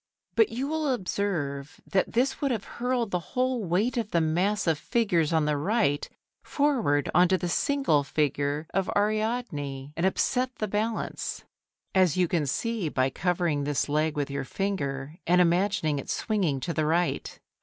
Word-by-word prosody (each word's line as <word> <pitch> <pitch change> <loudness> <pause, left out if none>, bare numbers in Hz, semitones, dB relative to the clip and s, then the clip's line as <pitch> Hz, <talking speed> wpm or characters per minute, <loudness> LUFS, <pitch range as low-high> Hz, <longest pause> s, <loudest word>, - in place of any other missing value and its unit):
But 445 - +4
you 255 +4 -3
will 310 -2 0
observe 170 - -2
that 190 - 0
this 255 +4 +1
would 280 - +1
have 225 -5 -1
hurled 245 -3 -2
the 180 - +1 0.2
whole 255 -2 +1
weight 200 +8 0
of 225 -3 -1
the 170 - +2
mass 180 +6 +1
of 160 -3 +1
figures 175 -9 +1
on 160 -2 +2
the 150 -1 +1
right, 155 -3 +1 0.3
forward 250 - +1
on 180 +1 +6
to 185 +1 +2
the 180 - -3
single 175 - +2
figure 145 +1 -1
of 195 0 0
Ariadne, 205 - -1
and 165 - -2
upset 250 +7 +1
the 215 - -2
balance; 215 +3 -2 0.5
as 185 -3 +3
you 180 -1 +3
can 160 -4 0
see 225 - -1
by 130 -1 +1
covering 170 -3 0
this 145 -2 0
leg 150 +1 0
with 145 -1 -1
your 140 -1 -2
finger 145 -4 -3
and 180 +1 +5
imagining 170 -4 +2
it - - -8
swinging 190 - 0
to 170 - -2
the 155 -2 0
right. 170 +2 0
180 Hz, 170 wpm, -27 LUFS, 150-220 Hz, 0.5 s, on